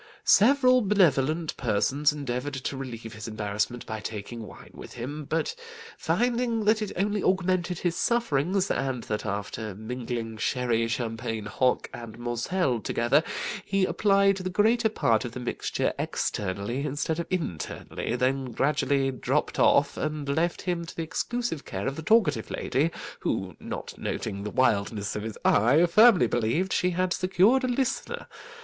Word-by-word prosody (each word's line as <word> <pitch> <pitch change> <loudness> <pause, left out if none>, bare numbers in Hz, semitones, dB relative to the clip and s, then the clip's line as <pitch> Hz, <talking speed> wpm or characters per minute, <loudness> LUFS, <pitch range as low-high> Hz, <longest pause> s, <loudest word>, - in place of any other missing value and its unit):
Several 255 +2 +5
benevolent 165 - +2
persons 135 +6 +2
endeavoured 140 -1 -3
to 135 +1 -4
relieve 115 -4 -7
his 105 0 -7
embarrassment 110 +2 -2
by 110 0 -5
taking 110 +1 -6
wine - - -13
with - - -10
him, 140 +5 -6
but 160 - -1 0.4
finding 235 -2 0
that 215 +1 +3
it 210 - -3
only 205 +2 0
augmented 185 -1 +1
his 175 0 -1
sufferings, 195 - +1
and 130 -3 -1
that 105 0 -3
after 105 +1 -4
mingling 115 0 -5
sherry, 115 0 0
champagne, 115 -2 -3
hock, 125 +4 +1
and 115 -2 -8
moselle 120 +4 -1
together, 120 +6 +2 0.4
he 195 -1 +1
applied 195 0 +3
the 185 -1 -3
greater 220 +4 +3
part 115 - +1
of 120 - -6
the 125 - -5
mixture 125 - -2
externally, 100 +7 -2
instead 150 +3 -2
of 170 - -3
internally, 140 - -3
they 125 +1 +3
gradually 135 +1 0
dropped 130 - -1
off, - - +4
and 150 -1 -3
left 165 +5 0
him 175 -2 -1
to 165 - -9
the 165 - -2
exclusive 235 0 -3
care 95 +1 -5
of 135 - -1
the 160 - -5
talkative 155 - +2
lady, 140 +6 0 0.3
who, 95 -3 -2
not - - -6
noting 100 -3 -3
the 105 - -4
wildness 105 -4 +1
of 105 - -2
his 110 0 -6
eye, 135 +11 +5
firmly 205 - +6
believed 120 +12 0
she 180 - +2
had 180 +1 0
secured 195 +8 +3
a - - +1
listener. 250 +1 -2
140 Hz, 155 wpm, -27 LUFS, 115-185 Hz, 0.4 s, firmly